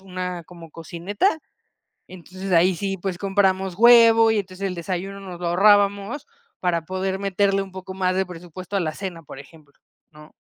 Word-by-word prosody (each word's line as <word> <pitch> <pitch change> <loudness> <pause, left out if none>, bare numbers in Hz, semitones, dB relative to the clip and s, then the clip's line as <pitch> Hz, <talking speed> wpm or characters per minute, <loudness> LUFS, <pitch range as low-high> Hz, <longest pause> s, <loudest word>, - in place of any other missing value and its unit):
una 180 -2 -5
como 165 -2 -13
cocineta, 185 - -2 0.7
entonces 185 +1 -8
ahí 175 +2 +4
sí, 195 +1 -3
pues 185 0 -4
compramos 190 -1 0
huevo 230 -1 +7
y 220 - +1
entonces 190 0 -6
el 180 - -5
desayuno 185 +3 -5
nos 180 -3 -9
lo 175 - -3
ahorrábamos 200 +6 +3 0.3
para 170 -3 0
poder 190 +1 -2
meterle 195 0 +1
un 195 -1 -6
poco 190 0 -8
más 185 -1 -1
de 190 - +1
presupuesto 180 +2 -10
a - - +1
la 155 -3 -2
cena, 180 -2 -7
por 135 - -11
ejemplo, 145 0 -16 0.4
¿no? 150 0 -16
185 Hz, 170 wpm, -22 LUFS, 175-195 Hz, 0.7 s, huevo